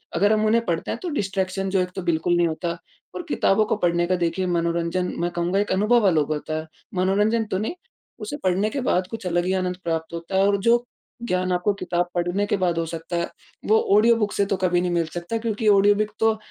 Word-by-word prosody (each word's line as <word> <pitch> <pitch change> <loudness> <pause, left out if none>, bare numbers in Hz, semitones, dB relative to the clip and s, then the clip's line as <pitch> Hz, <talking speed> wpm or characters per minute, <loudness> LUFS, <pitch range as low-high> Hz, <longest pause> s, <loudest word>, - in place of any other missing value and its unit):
अगर 205 +5 +3
हम 215 0 +1
उन्हें 230 +2 +3
पढ़ते 165 -4 -2
हैं - - -4
तो 360 - -2
डिस्ट्रैक्शन 195 - -2
जो 190 0 +1
है 180 - +2
तो 190 - -3
बिल्कुल 170 0 +1
नहीं 175 - +3
होता 170 +2 -3 0.4
और 355 - -4
किताबों 215 -5 +2
को - - 0
पढ़ने 175 -3 +1
का 185 - +2
देखिए 175 +1 -1
मनोरंजन 170 +1 -1
मैं 175 +1 -1
कहूँगा 175 +3 0
एक 205 - -1
अनुभव 210 +3 +3
अलग 155 -5 +2
होता 155 +1 -3
है, 155 - -8 0.3
मनोरंजन 205 +5 +2
तो 190 - +1
नहीं, 215 - -3 0.4
उसे 220 +7 -5
पढ़ने 190 +3 +1
के 275 +3 -3
बाद 185 -7 +1
कुछ 225 -5 -5
अलग 175 0 0
ही 185 - 0
आनंद 180 -1 -1
प्राप्त 165 -1 -3
होता 170 +3 -5
है। 195 - +4
और 200 0 +2
जो 235 +4 +3 0.4
ज्ञान 185 -2 0
आपको 180 +3 +1
किताब 175 0 -1
पढ़ने 175 +3 0
के 205 - +1
बाद 180 -3 0
हो 165 - -1
सकता 165 +1 -6
है, 170 - -1 0.4
वो 220 +1 +4 0.2
ऑडियो 230 +2 +5
बुक 210 -2 0
से 200 - +1
तो 195 0 -1
कभी 180 -1 +1
नहीं 180 0 -1
मिल 170 -1 +1
सकता 175 +6 -3
क्योंकि 220 -1 -2
ऑडियो 205 0 +5
बुक 215 +1 -1
तो 225 -1 +3
185 Hz, 235 wpm, -23 LUFS, 175-210 Hz, 0.4 s, ऑडियो